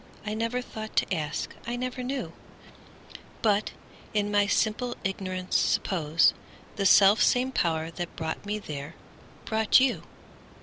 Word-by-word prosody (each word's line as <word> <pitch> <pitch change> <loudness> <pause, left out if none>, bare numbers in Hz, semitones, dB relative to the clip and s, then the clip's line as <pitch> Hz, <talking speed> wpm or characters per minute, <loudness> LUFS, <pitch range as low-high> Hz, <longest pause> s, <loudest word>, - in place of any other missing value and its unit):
I 210 - -2
never 230 +3 -2
thought 220 -2 -8
to - - +1
ask, 155 -3 -3
I 240 - -2
never 255 +1 -4
knew:But, 230 -4 -5 0.4
in 205 0 +1
my 205 0 +3
simple 230 +4 0
ignorance, 185 -1 0
supposeThe 170 +4 0
self 200 +3 +6
same 255 +1 +3
Power 160 -7 0
that 175 +1 -6
brought 160 0 -4
me 205 +1 -2
there 150 -5 -7 0.5
brought 220 +1 +4
you. 260 -1 +1
205 Hz, 125 wpm, -27 LUFS, 175-230 Hz, 0.5 s, self